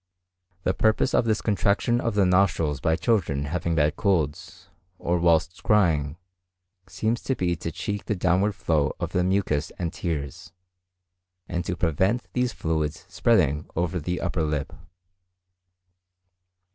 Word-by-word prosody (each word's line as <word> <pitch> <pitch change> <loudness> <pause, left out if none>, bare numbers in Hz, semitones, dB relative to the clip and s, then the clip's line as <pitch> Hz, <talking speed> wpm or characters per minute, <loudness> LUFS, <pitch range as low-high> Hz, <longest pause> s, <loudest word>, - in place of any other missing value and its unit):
The 95 - +1
purpose 110 +6 +2
of - - +3
this 110 -2 0
contraction 105 +3 +1
of 115 -4 -1
the 100 -2 +4
nostrils 90 -6 +2
by 80 -1 +1
children 85 - 0
having 85 +2 -2
bad 75 -1 +2
colds, 80 -8 -1 0.3
or 85 0 0
whilst 85 +1 +2
crying, 80 -8 +2 0.7
seems 110 +4 -1
to 130 - -1
be 90 -4 0
to 85 - -4
check 100 +4 -4
the 105 - -1
downward 95 +3 +1
flow 80 -7 0
of - - -3
the 90 - +1
mucus 90 -5 0
and 85 -2 -3
tears, 75 -2 -5 0.9
and 85 0 -2
to 90 - -2
prevent 95 - +1
these 125 -1 +1
fluids 80 -2 -2
spreading 90 - +2
over 90 +2 -1
the 90 +3 -3
upper 85 - -1
lip. 75 -3 -2
90 Hz, 140 wpm, -25 LUFS, 80-100 Hz, 0.9 s, the